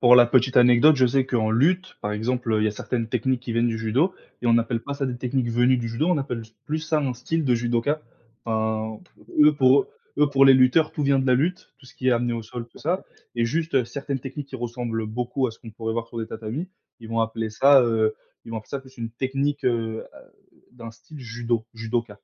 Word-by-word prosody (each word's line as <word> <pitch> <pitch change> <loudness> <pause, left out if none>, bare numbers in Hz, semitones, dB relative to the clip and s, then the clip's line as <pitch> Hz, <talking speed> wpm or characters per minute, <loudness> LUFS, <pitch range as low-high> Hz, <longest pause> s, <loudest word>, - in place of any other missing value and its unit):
Pour 125 0 +7
la 120 -1 +7
petite 130 +1 +2
anecdote, 125 +5 +6
je 130 -1 +4
sais 130 +2 +2
qu'en 110 -4 0
lutte, 180 +10 +1
par 105 0 -2
exemple, 115 +2 -1
heu, 110 - +2
il - - +1
y - - +3
a - - +1
certaines 115 +2 -3
techniques 125 +1 0
qui 120 -2 -5
viennent 115 +1 +2
du 110 -1 -2
judo 130 - +1 0.3
et - - -1
on 115 0 +5
appelle 115 0 -1
pas 140 +2 -5
ça 140 -1 -2
des 125 -1 -3
techniques 125 -1 -1
venues 120 +2 +3
du 115 -1 -3
judo, 120 +9 -1
on 180 -4 +2
appelle 125 -4 -4 0.2
plus 155 +1 -1
ça 155 -1 0
un 135 -4 -1
style 155 +6 -2
de 125 -2 +3
judoka. 120 +6 0 0.4
Enfin, 110 -1 -2 0.2
p - - -24 0.2
eux 150 0 +6
pour 130 0 +5
eux - - -20 0.3
eux, 150 -1 +4
pour 135 -1 +4
les 135 - +8
lutteurs, 130 +5 +4
tout 150 - -3
vient 140 -1 +3
de 135 - 0
la 130 - +4
lutte, 170 +8 -1
tout 130 - -18
ce - - -16
qui 130 - -1
est - - +5
amené 120 0 +1
au 115 - -4
sol 115 +2 -7
tout - - -17
ça 180 +4 -1 0.3
et 115 - +2
juste 155 -2 0
certaines 140 +1 -4
techniques 135 +2 -7
qui 130 - -7
ressemblent 120 -2 -4
beaucoup 125 +4 -2
à - - -4
ce - - -17
qu'on 115 - -11
pourrait 110 +1 -4
voir 115 -1 -3
sur 115 - -7
les 110 - -3
tatamis, 115 +11 -5 0.3
ils 115 - -10
vont 115 0 -1
appeler 115 0 -2
ça, 135 +5 +6
heu, 110 -2 +1 0.3
ils - - -11
vont 115 - -3
appeler 110 - -14
ça 140 - -4
plus 130 0 -18
une 115 - -4
technique, 135 +4 -2
heu, 115 -2 -1 0.7
d'un 115 -2 -9
style 125 +7 -14
judo, 115 -1 -2
judoka. 115 -1 -3
120 Hz, 250 wpm, -24 LUFS, 115-135 Hz, 0.7 s, les